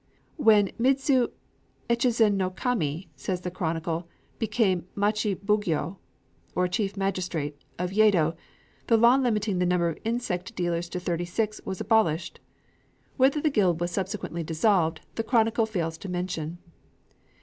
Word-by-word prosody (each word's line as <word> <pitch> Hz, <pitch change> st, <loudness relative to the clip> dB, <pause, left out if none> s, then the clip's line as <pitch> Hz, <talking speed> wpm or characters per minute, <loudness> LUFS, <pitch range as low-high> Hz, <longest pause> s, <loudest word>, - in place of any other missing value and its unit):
"When 215 Hz, -, +5 dB
Midzu 265 Hz, 0 st, +3 dB, 0.6 s
Echizen 235 Hz, -2 st, +3 dB
no 190 Hz, -2 st, 0 dB
Kami," 185 Hz, -, -2 dB
says 180 Hz, +7 st, -3 dB
the 180 Hz, -, -4 dB
chronicle, 165 Hz, -1 st, -2 dB, 0.3 s
"became 195 Hz, -6 st, +1 dB
machi 210 Hz, 0 st, +1 dB
bugyō 195 Hz, -4 st, -1 dB, 0.6 s
(or 180 Hz, 0 st, +2 dB
chief 195 Hz, +2 st, -2 dB
magistrate) 175 Hz, -7 st, -2 dB
of 180 Hz, +1 st, -2 dB
Yedo, 190 Hz, -6 st, +4 dB, 0.5 s
the 230 Hz, -, +5 dB
law 235 Hz, +3 st, +6 dB
limiting 215 Hz, -7 st, 0 dB
the 180 Hz, -, +2 dB
number 175 Hz, -1 st, +2 dB
of 165 Hz, -, -6 dB
insect 220 Hz, -6 st, -2 dB
dealers 175 Hz, -1 st, -1 dB
to 180 Hz, -, -4 dB
thirty 175 Hz, -1 st, -2 dB
six, 215 Hz, +4 st, -2 dB
was 190 Hz, -, -4 dB
abolished." 210 Hz, -7 st, +1 dB, 0.8 s
Whether 270 Hz, +3 st, +4 dB
the 310 Hz, -, +2 dB
guild 185 Hz, -, +2 dB
was 175 Hz, 0 st, -1 dB
subsequently 190 Hz, -3 st, -3 dB
dissolved 165 Hz, 0 st, +1 dB
the 225 Hz, -, -2 dB
chronicle 225 Hz, -1 st, +2 dB
fails 165 Hz, -6 st, -3 dB
to 195 Hz, -, -7 dB
mention. 175 Hz, -2 st, -3 dB
190 Hz, 140 wpm, -27 LUFS, 175-220 Hz, 0.8 s, law